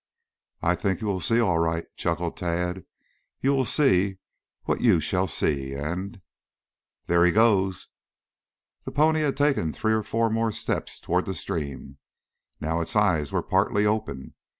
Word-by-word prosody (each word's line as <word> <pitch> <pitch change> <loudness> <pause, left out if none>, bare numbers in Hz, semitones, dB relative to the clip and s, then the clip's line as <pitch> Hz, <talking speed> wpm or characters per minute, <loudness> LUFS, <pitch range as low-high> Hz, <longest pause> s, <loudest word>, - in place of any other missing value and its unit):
"I - - +3
think 95 -5 -1
you 110 - -5
will 100 -3 -1
see, 115 +6 +2
all 90 -8 +2
right," 85 0 0
chuckled 85 0 -2
Tad. 90 +1 -2 0.5
"You 135 +1 +2
will 135 -2 +1
see 100 - +3 0.5
what - - -1
you 110 -9 +4
shall 90 +5 0
see, 70 -4 -1
and 90 +7 -5 0.4
" - - -61
"There 85 0 +3
he 90 - +5
goes!" 95 -3 +2 1.0
The - - -6
pony 155 +2 +3
had 140 -3 0
taken 140 - +1
three 110 +6 0
or 110 - +1
four 115 +1 0
more 115 0 +1
steps - - -3
toward - - -1
the - - -3
stream. 70 -3 -5 0.6
Now 80 +2 -1
its 80 - -3
eyes 90 -9 +2
were - - -1
partly 105 +1 +1
open. 105 -10 -2
95 Hz, 160 wpm, -25 LUFS, 85-110 Hz, 1.0 s, he